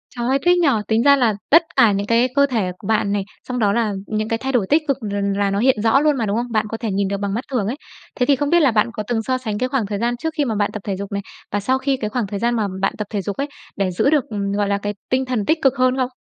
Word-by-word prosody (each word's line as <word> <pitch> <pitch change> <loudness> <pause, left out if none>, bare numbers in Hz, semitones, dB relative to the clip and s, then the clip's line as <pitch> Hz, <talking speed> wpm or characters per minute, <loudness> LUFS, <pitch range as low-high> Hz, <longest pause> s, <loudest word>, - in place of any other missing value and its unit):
Trời 240 -1 -2
ơi, 270 +2 +2
thích 355 0 +5
nhỉ! 340 - +3 0.2
Tính 225 +1 +2
ra 280 +1 +7
là 240 -6 +2
tất 330 +3 +7
cả 225 - +6
những 200 +1 -2
cái 230 +2 +3
cơ 280 0 +5
thể 220 -9 -1
của 195 - -10
bạn 210 -2 +1
này, 200 -1 0 0.2
xong 250 -1 -3
đó 205 -3 +2
là 225 -2 0
những 215 0 -2
cái 225 - 0
thay 265 +3 -3
đổi 235 -7 +1
tích 305 +2 +4
cực 275 -2 +1
l 205 -2 -4 0.2
là 200 -1 +1
nó 200 - 0
hiện 250 -2 +3
rõ 225 +5 +4
luôn 300 -1 +2
mà, 230 - 0
đúng 205 +1 -1
không? 240 0 -3
Bạn 215 -1 +1
có 225 - -4
thể 225 -2 -3
nhìn 195 0 0
được 200 +1 -2
bằng 200 0 -3
mắt 235 +4 -2
thường 230 -7 0
ấy. 235 - -2 0.4
Thế 250 - +3
thì 280 - +4
không 285 +2 -1
biết 345 - +5
là 285 -6 +4
bạn 220 +1 +2
có 215 - -4
từng 230 -2 -1
so 255 +3 0
sánh 220 -5 -4
cái 255 +3 -1
khoảng 255 -5 0
thời 200 0 -4
gian 240 +2 0
trước 320 +6 -3
khi 295 - +2
mà 225 -4 -1
bạn 205 0 0
tập 215 - -4
thể 200 - -2
dục 200 +1 -6
này, 200 0 -2 0.3
và 205 - 0
sau 255 +6 +1
khi 265 0 0
cái 215 -4 -3
khoảng 230 -1 -2
thời 200 +1 -4
gian 240 +2 +1
mà 215 -3 0
bạn 195 - +1
tập 210 - -4
thể 205 -2 -2
dục 200 +1 -5
ấy, 280 - -1 0.3
để 195 -2 0
giữ 180 +9 +2
được, 300 -3 +3
ừm, 200 -2 -2
gọi 205 0 0
là, 200 0 +1
cái 205 +1 -3 0.2
tinh 260 +1 +1
thần 245 -5 -2
tích 320 +7 +2
cực 270 -2 +4
hơn 255 0 +2
không? 255 -1 0
230 Hz, 335 wpm, -20 LUFS, 205-260 Hz, 0.4 s, ra